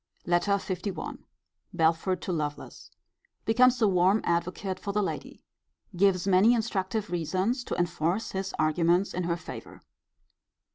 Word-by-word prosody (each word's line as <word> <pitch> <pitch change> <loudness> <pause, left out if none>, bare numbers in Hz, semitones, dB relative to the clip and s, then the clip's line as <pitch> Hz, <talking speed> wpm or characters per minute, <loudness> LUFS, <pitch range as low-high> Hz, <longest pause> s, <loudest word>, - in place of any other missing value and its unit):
LETTER 175 +4 +2 0.2
LI. 190 -6 -4 0.6
Belford 165 +3 +1
to - - -3
Lovelace. 150 -3 -5 0.6
Becomes 250 +2 +4
a - - +6
warm 190 +2 +3
advocate 180 +2 -1
for 200 - -4
the 210 0 +1
lady. - - -5 0.5
Gives 185 0 +3
many 195 +5 +5
instructive 210 -3 -2
reasons 185 - -1
to - - -3
enforce 175 +3 -1
his 195 0 -3
arguments 170 +4 +2
in 180 0 -2
her 170 0 0
favour. - - -10
185 Hz, 130 wpm, -28 LUFS, 170-200 Hz, 0.6 s, a